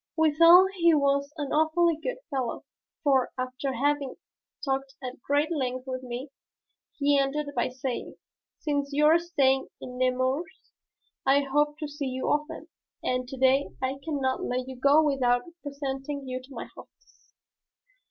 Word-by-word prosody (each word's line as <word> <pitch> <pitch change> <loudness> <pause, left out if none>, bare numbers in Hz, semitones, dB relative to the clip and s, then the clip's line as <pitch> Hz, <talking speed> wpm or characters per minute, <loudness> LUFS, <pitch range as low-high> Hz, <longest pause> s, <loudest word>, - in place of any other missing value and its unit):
Withal 335 +4 +7
he 340 -3 +4
was 280 0 +1
an 290 -2 -4
awfully 315 +2 +3
good - - -4
fellow, 260 -4 -3 0.4
for, 270 -4 +3
after 255 +1 -3
having 280 +1 0 0.5
talked 270 0 -2
at 255 -2 -7
great 290 +5 +1
length 255 -4 -2
with 255 -1 -4
me, 255 +2 -6 0.7
he 285 -1 +3
ended 285 +2 -1
by 240 - +1
saying, 255 0 -5 0.4
"Since 285 -2 -1
you 295 +1 +3
are 320 +2 +6
staying 270 -6 +1
in 250 0 -8
Nemours 255 +6 -1 0.5
I 275 +1 +4
hope 295 +2 +1
to 305 -1 -4
see 290 -1 -4
you 260 0 -2
often, 300 +2 -2 0.4
and 255 0 -1
to 265 - -7
day 265 +2 +3
I 265 +1 -2
cannot 275 -5 -1
let 250 +1 -2
you 260 - -7
go 280 +5 +5
without 250 -4 +2 0.2
presenting 280 -1 -5
you 255 0 -4
to 260 +2 -17
my - - -6
hostess." - - -18
275 Hz, 150 wpm, -27 LUFS, 260-300 Hz, 0.7 s, Withal